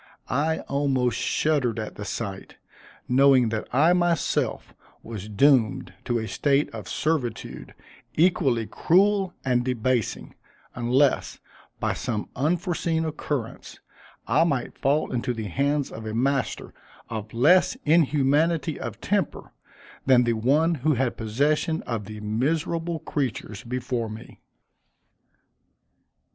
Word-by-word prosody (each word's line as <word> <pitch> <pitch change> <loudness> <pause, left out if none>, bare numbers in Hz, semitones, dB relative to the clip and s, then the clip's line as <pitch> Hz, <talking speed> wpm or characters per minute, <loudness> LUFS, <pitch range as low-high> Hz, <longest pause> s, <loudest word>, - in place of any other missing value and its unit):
I 155 +6 0
almost 130 -4 0
shuddered 140 -7 +1
at 110 -1 -4
the 105 - -7
sight, 100 -4 -5 0.5
knowing 130 -2 +5
that 110 -1 -3
I 155 +7 +4
myself 175 -3 0 0.3
was 110 -2 -7
doomed 120 -1 +3
to 120 - 0
a 110 -1 -3
state 140 +3 +1
of - - -7
servitude 135 -8 -3 0.4
equally 145 -9 +2
cruel 190 - +2
and 125 -2 +2
debasing, 125 -2 -1 0.4
unless, 125 +3 +1 0.4
by - - 0
some 110 -4 -3
unforeseen 165 +2 0
occurrence, 145 -6 -5 0.5
I - - +3
might 140 -7 -1
fall 145 +3 +1
into 125 0 -2
the 110 -3 -4
hands 140 +5 0
of 110 0 -7
a 110 - -4
master 135 +2 -1 0.3
of 110 -1 -6
less 150 +11 +4
inhumanity 155 +1 +2
of - - -6
temper - - -1 0.6
than 125 -2 +6
the 120 -1 +1
one 140 +9 +2
who 155 +1 +2
had 125 0 0
possession 145 +8 0
of 115 -4 -4
the 105 +1 -8
miserable 160 +9 -1
creatures 130 -9 -4
before 125 -1 -3
me. 110 +1 -10
135 Hz, 120 wpm, -25 LUFS, 115-155 Hz, 0.6 s, than